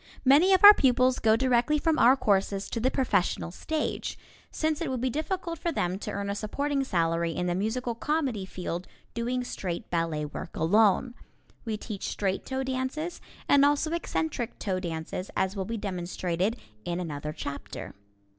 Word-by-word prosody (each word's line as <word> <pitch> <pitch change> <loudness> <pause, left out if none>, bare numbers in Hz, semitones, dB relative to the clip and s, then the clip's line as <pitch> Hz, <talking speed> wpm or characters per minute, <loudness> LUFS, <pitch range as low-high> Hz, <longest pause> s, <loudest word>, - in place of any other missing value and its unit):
Many 295 +9 +6
of 380 0 +4
our 410 +1 +13
pupils 255 -4 +3
go 220 0 +4
directly 255 +4 +2
from 320 +1 +1
our 255 +3 +6
courses 200 -3 0
to 230 - -2
the 250 +3 +2
professional 200 -10 0
stage, 310 - -3 0.3
since 310 0 -1
it 330 - -1
would 260 -1 -2
be 255 +1 0
difficult 335 +3 -3
for 340 - -1
them 180 - -1
to 210 - -5
earn 200 -1 -3
a 200 - -1
supporting 275 +7 -1
salary 165 -6 0
in 180 - -1
the 175 - 0
musical 225 +6 -1
comedy 265 -4 -1
field 180 -1 -5 0.3
doing 245 +2 -1
straight 180 -7 -5
ballet 165 -3 -1
work 150 +3 -7
alone. 210 +7 +3 0.5
We 220 -2 -2
teach 210 -2 -6
straight 195 -1 -2
toe 265 0 -2
dances, 265 +6 -3 0.3
and 280 -1 +5
also 290 +2 +2
eccentric 310 -7 -2
toe 190 -3 -2
dances, 170 +1 -5
as 190 +1 0
will 190 -1 -2
be 230 +3 -3
demonstrated 185 +1 -2 0.3
in 175 0 -3
another 150 -3 -4
chapter. 140 -10 -7
225 Hz, 170 wpm, -28 LUFS, 185-270 Hz, 0.5 s, our